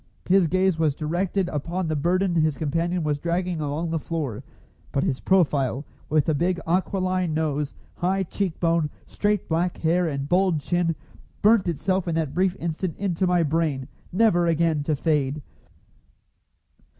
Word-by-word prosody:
His 185 -1 +4
gaze 185 0 +1
was 155 -4 +2
directed 175 +5 -1
upon 170 +4 -2
the 155 - -1
burden 180 +5 +1
his 155 -3 +2
companion 165 +3 -1
was 150 -1 0
dragging 175 0 -1
along 150 +3 -2
the 165 - 0
floor; 150 -9 -4 0.5
but 140 - 0
his 130 - -1
profile, 145 -8 +2 0.2
with 155 -1 +3
the 160 - +2
big 175 +4 0
aquiline 185 -1 0
nose, 150 -2 -1 0.2
high 190 +2 +1
cheek 185 -1 -3
bone, 165 -3 +2 0.2
straight 210 -1 -1
black 170 +2 0
hair 170 +2 +2
and 140 -2 -3
bold 180 -1 +2
chin, 170 +2 0 0.5
burnt 215 -2 +5
itself 175 +3 0
in 165 - 0
that 160 -4 -1
brief 185 0 +1
instant 170 +1 -3
into 185 -2 0
my 180 -1 +3
brain, 150 -4 0 0.2
never 180 -4 +3
again 165 -2 +2
to 150 +1 0
fade. 145 -1 0
165 Hz, 155 wpm, -24 LUFS, 150-180 Hz, 0.5 s, burnt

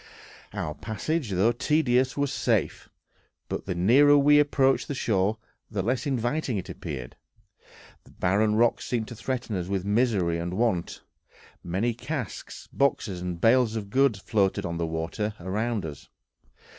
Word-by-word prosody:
Our 75 - -3
passage, 125 - -3
though 100 +4 +3
tedious, 130 0 +1
was 145 -1 0
safe; - - 0 0.6
but - - -5
the 95 - -2
nearer 135 +11 +6
we 145 +1 +6
approached 135 -2 +2
the 145 - -3
shore 105 -3 +1 0.3
the 100 -4 -2
less 125 +7 -1
inviting 130 -1 -1
it 95 - -5
appeared; 70 -7 -6 0.9
the - - -20
barren 105 +4 +1
rocks 120 +1 +2
seemed 115 -3 -1
to 120 - -8
threaten 120 -1 -3
us 90 -2 -3
with 95 -1 -2
misery 100 -6 +1
and 85 +2 -3
want. 105 -6 -1 0.6
Many 100 +8 -1
casks, 125 - -6
boxes, 105 -9 0
and 90 -1 -4
bales 115 +2 +4
of 100 -3 -5
goods 135 -3 +3
floated 100 -1 0
on 85 0 -3
the 85 - -1
water 85 +7 -3
around 105 +3 -2
us. 75 -3 -9
110 Hz, 150 wpm, -26 LUFS, 95-130 Hz, 0.9 s, nearer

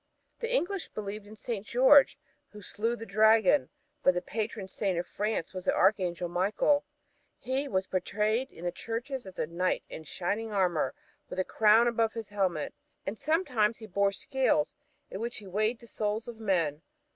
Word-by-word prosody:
The 465 0 -3
English 395 -6 0
believed 205 0 -6
in 215 - -11
St. 215 -2 -4
George, 265 +5 +6 0.4
who 210 - -10
slew 225 +5 -1
the 225 - -8
dragon; 215 - +4 0.3
but 185 - +4
the 180 - 0
patron 215 -2 -3
Saint 190 -1 -1
of 175 - -1
France 210 -4 -2
was 185 -1 -6
the - - +2
Archangel 180 -3 +2
Michael. 200 - +2 0.5
He 265 +3 -2
was 190 -5 0
portrayed 210 +7 0
in 175 - -10
the 175 - 0
churches 240 +3 -5
as 185 - -11
a - - 0
knight 175 +3 -1
in 160 - -7
shining 205 +8 -2
armor 180 -9 +1 0.3
with - - -6
a 185 - +2
crown 220 +2 +5
above 230 -2 +1
his 225 -3 -6
helmet, 185 -7 -1 0.3
and 195 - -3
sometimes 255 - +1
he 220 - -9
bore 200 0 +1
scales 200 - +1 0.4
in 190 - -5
which 235 +1 -2
he 205 - -8
weighed 215 +5 0
the 235 - -14
souls 215 -1 -2
of 235 -2 -8
men. 170 -8 0
210 Hz, 180 wpm, -30 LUFS, 185-230 Hz, 0.5 s, George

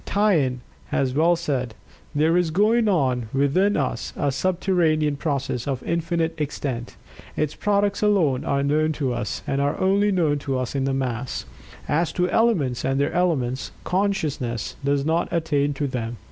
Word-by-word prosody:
Taine 160 - +1 0.3
has 130 -2 0
well 165 +5 +4
said, 135 -9 -2 0.4
"There 160 +3 +3
is 175 -2 +2
going 215 +7 +3
on 130 - +1
within 145 +10 +2
us 130 -4 -2
a 140 - +1
subterranean 165 -2 +1
process 140 -5 -2
of 135 -3 -2
infinite 165 0 -1
extent; 135 -4 -4 0.4
its 155 -1 0
products 200 -1 +1
alone 180 -11 +2
are 140 0 0
known 155 +2 +2
to 135 -4 -1
us, 105 -3 -4
and 135 0 0
are 145 +1 0
only 200 +2 +3
known 160 -6 +1
to 135 -2 -2
us 130 -1 -3
in 135 -1 0
the 135 - 0
mass. 125 -1 -3 0.4
As 160 +3 +1
to 180 0 +1
elements, 175 - +2
and 135 +1 0
their 140 - 0
elements, 140 -8 0
consciousness 155 - -1
does 140 0 +1
not 165 +2 +1
attain 145 -4 +1
to 145 - -1
them. 120 -3 -3
145 Hz, 160 wpm, -23 LUFS, 135-175 Hz, 0.4 s, well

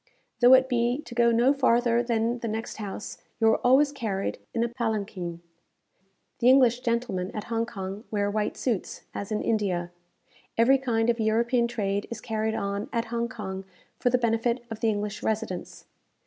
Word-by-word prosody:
Though 250 +1 +8
it 260 0 +4
be 245 +3 0
to 240 - -9
go 235 0 +4
no 240 +4 +4
farther 240 -3 +3
than 235 0 0
the 230 - -4
next 225 +1 -4
house, 210 -1 -6 0.2
you 225 - +2
are - - +3
always 270 +4 +4
carried 220 -8 -3
in 230 - 0
a - - +1
palanquin. 210 -8 -3 1.0
The 240 - +5
English 255 -2 +5
gentlemen 230 -7 -1
at 210 - -3
Hong 230 0 0
Kong 195 -1 -6
wear 205 -1 0
white 210 0 -1
suits, 230 -8 -2
as 200 - -5
in 210 - -1
India. 185 -6 0 0.7
Every 260 +4 +5
kind 235 -3 +1
of 230 - -5
European 235 +2 +2
trade 200 -3 -2
is 235 -2 -5
carried 220 0 -2
on 200 +1 -3
at 230 -1 -1
Hong 235 0 -1
Kong 190 -5 -6 0.4
for 245 - +2
the 250 - +3
benefit 235 +1 0
of 220 - -5
the 225 - +2
English 210 -1 -2
residents. 215 -5 -3
230 Hz, 175 wpm, -27 LUFS, 210-240 Hz, 1.0 s, Though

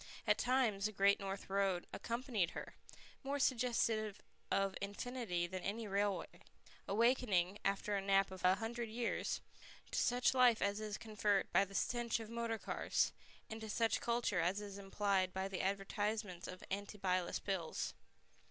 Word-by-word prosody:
At - - +3
times 240 -6 +2
the - - -5
Great 200 0 +4
North 195 0 -4
Road 195 -2 +1
accompanied 235 -6 -1
her, - - -6 0.5
more 280 +1 -2
suggestive 230 -5 +1 0.3
of 195 -1 +2
infinity 205 -3 -2
than 185 +1 -5
any 215 +4 -3
railway, 200 0 -1 0.5
awakening, 210 -4 +2
after 200 +1 0
a 200 - 0
nap 195 0 +3
of 190 - -8
a 185 +1 +6
hundred 230 +2 -3
years, 230 +1 -1 0.5
to - - +1
such 245 +1 +3
life 250 -3 +6
as 200 +1 +1
is 210 -1 -3
conferred 210 -3 0
by 200 - +5
the 195 0 -11
stench 240 0 0
of 225 0 -7
motor 230 -1 -1
cars, - - 0 0.3
and 220 0 -6
to 220 - -6
such 225 +2 +1
culture 235 -5 +1
as 180 +4 +1
is 200 -1 -7
implied 195 -1 0
by 190 0 -1
the 195 -2 -3
advertisements 200 -1 -2
of 185 0 -8
antibilious 195 -3 -1
pills. 190 -5 -2
205 Hz, 155 wpm, -38 LUFS, 195-230 Hz, 0.5 s, a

